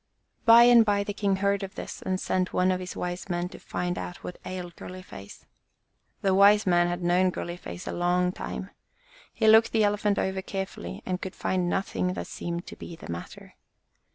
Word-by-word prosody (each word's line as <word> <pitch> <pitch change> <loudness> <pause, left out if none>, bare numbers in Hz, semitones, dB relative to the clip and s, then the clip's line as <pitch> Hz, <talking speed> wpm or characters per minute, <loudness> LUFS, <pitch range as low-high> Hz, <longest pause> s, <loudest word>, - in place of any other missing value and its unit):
By 230 +1 +9
and 240 -1 +8
by 205 -2 +1
the 205 - -4
king 200 -1 +1
heard 200 +1 +1
of 195 0 -7
this - - -7
and 185 0 -1
sent 185 -1 -1
one 185 +1 +3
of 185 - 0
his 180 -1 -6
wise 180 +2 -4
men 175 0 -1
to - - -11
find 180 0 -3
out 175 - -7
what 180 - -7
ailed 180 -2 -6
Girly 185 0 -9
face. 100 - -12 0.8
The 195 -1 +3
wise 200 +2 +6
man 175 -2 +3
had 175 0 -3
known 180 +2 +3
Girly 175 -1 -5
face 85 - -8
a - - -3
long 180 +1 +1
time. 190 +1 -6 0.6
He 220 - 0
looked 220 +1 +7
the 220 -1 +3
Elephant 205 0 +1
over 190 0 -1
carefully 190 - -6
and 185 0 -2
could 190 - -6
find 180 -2 -1
nothing 185 -1 -1
that - - -5
seemed 170 0 -5
to - - -9
be 170 - -9
the 160 - -9
matter. 85 0 -8
185 Hz, 205 wpm, -27 LUFS, 175-200 Hz, 0.8 s, By